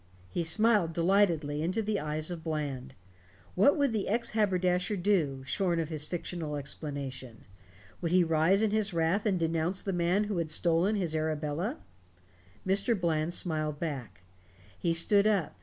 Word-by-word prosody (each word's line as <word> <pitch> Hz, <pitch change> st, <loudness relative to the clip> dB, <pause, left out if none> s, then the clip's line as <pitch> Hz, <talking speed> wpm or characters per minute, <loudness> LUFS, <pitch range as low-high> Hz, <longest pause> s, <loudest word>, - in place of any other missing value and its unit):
He 170 Hz, -, -1 dB
smiled 205 Hz, -1 st, +2 dB
delightedly 170 Hz, -4 st, +2 dB
into 185 Hz, +7 st, -1 dB
the 210 Hz, -1 st, -1 dB
eyes 155 Hz, +2 st, -2 dB
of 170 Hz, -2 st, -6 dB
Bland. 140 Hz, -5 st, -4 dB, 0.6 s
What 215 Hz, -, +4 dB
would 285 Hz, -3 st, +2 dB
the 215 Hz, -3 st, -2 dB
ex 235 Hz, +3 st, 0 dB
haberdasher 185 Hz, -2 st, +1 dB
do, 170 Hz, -9 st, 0 dB
shorn 170 Hz, +5 st, 0 dB
of 160 Hz, -2 st, -2 dB
his 155 Hz, -2 st, -4 dB
fictional 170 Hz, -3 st, -4 dB
explanation? 140 Hz, -4 st, -5 dB, 0.6 s
Would 170 Hz, -2 st, -1 dB
he 180 Hz, 0 st, +5 dB
rise 165 Hz, +5 st, +2 dB
in 215 Hz, -, +2 dB
his 215 Hz, -3 st, 0 dB
wrath 170 Hz, +6 st, +1 dB
and 190 Hz, -3 st, +1 dB
denounce 165 Hz, +3 st, 0 dB
the 195 Hz, -, -2 dB
man 175 Hz, +4 st, +1 dB
who 205 Hz, -4 st, -2 dB
had 165 Hz, -2 st, -2 dB
stolen 170 Hz, +6 st, +3 dB
his 175 Hz, -6 st, -1 dB
Arabella? 155 Hz, +3 st, -2 dB, 0.9 s
Mr. 200 Hz, +3 st, +2 dB
Bland 165 Hz, -1 st, 0 dB
smiled 155 Hz, -3 st, -2 dB
back. 125 Hz, -, -5 dB, 0.5 s
He 95 Hz, -, -1 dB
stood 200 Hz, +5 st, +4 dB
up. 200 Hz, -7 st, 0 dB
170 Hz, 155 wpm, -30 LUFS, 155-195 Hz, 0.9 s, he